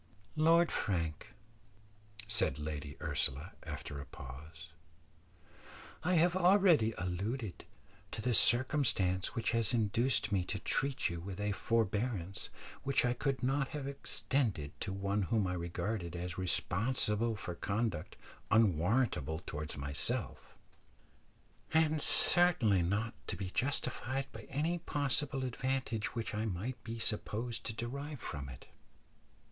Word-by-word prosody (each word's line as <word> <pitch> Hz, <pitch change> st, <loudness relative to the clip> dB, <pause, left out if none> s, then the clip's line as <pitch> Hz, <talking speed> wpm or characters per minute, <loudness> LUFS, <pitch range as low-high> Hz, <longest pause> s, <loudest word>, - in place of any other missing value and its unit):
"Lord 165 Hz, +2 st, +5 dB
Frank," 85 Hz, +4 st, -2 dB, 0.9 s
said 110 Hz, -, +1 dB
Lady 75 Hz, -1 st, -5 dB
Ursula, 75 Hz, +1 st, -2 dB
after 70 Hz, -, -6 dB
a 70 Hz, -, -6 dB
pause, 75 Hz, +6 st, -10 dB, 1.3 s
"I 180 Hz, +2 st, +2 dB
have 175 Hz, +2 st, +4 dB
already 180 Hz, -, +5 dB
alluded 95 Hz, +4 st, -3 dB, 0.4 s
to -, -, -6 dB
the 125 Hz, -, +2 dB
circumstance 115 Hz, -8 st, +3 dB
which 115 Hz, -, 0 dB
has 115 Hz, -1 st, +2 dB
induced 110 Hz, 0 st, +3 dB
me 95 Hz, -3 st, +2 dB
to 100 Hz, -, -2 dB
treat 135 Hz, +7 st, 0 dB
you 85 Hz, -, -4 dB
with 95 Hz, +2 st, -6 dB
a 105 Hz, 0 st, 0 dB
forbearance 105 Hz, -3 st, -1 dB, 0.3 s
which 135 Hz, -2 st, +2 dB
I 125 Hz, -, +2 dB
could 130 Hz, +1 st, -1 dB
not 135 Hz, +2 st, +1 dB
have 140 Hz, -, -5 dB
extended 125 Hz, -, -1 dB
to -, -, -2 dB
one 100 Hz, +1 st, -1 dB
whom 105 Hz, +1 st, +1 dB
I 90 Hz, -, -1 dB
regarded 85 Hz, +1 st, -3 dB
as 90 Hz, 0 st, -4 dB
responsible 105 Hz, +4 st, +1 dB
for 90 Hz, -4 st, -5 dB
conduct 100 Hz, -1 st, -2 dB, 0.3 s
unwarrantable 95 Hz, -, +2 dB
towards 75 Hz, -1 st, -5 dB
myself, 70 Hz, 0 st, -3 dB, 1.2 s
and 155 Hz, -1 st, +4 dB
certainly 135 Hz, -, +5 dB
not 100 Hz, +6 st, 0 dB
to -, -, -2 dB
be 95 Hz, -2 st, -5 dB
justified 130 Hz, +1 st, -1 dB
by -, -, -10 dB
any 160 Hz, +5 st, 0 dB
possible 145 Hz, -3 st, 0 dB
advantage 125 Hz, -3 st, -2 dB
which 115 Hz, -1 st, -3 dB
I 105 Hz, +1 st, -1 dB
might 110 Hz, +4 st, -4 dB
be 115 Hz, -1 st, -5 dB
supposed 115 Hz, +2 st, -1 dB
to 110 Hz, -, -3 dB
derive 140 Hz, +5 st, -5 dB
from 70 Hz, -9 st, -5 dB
it. 60 Hz, -, -10 dB
110 Hz, 125 wpm, -34 LUFS, 90-130 Hz, 1.3 s, Lord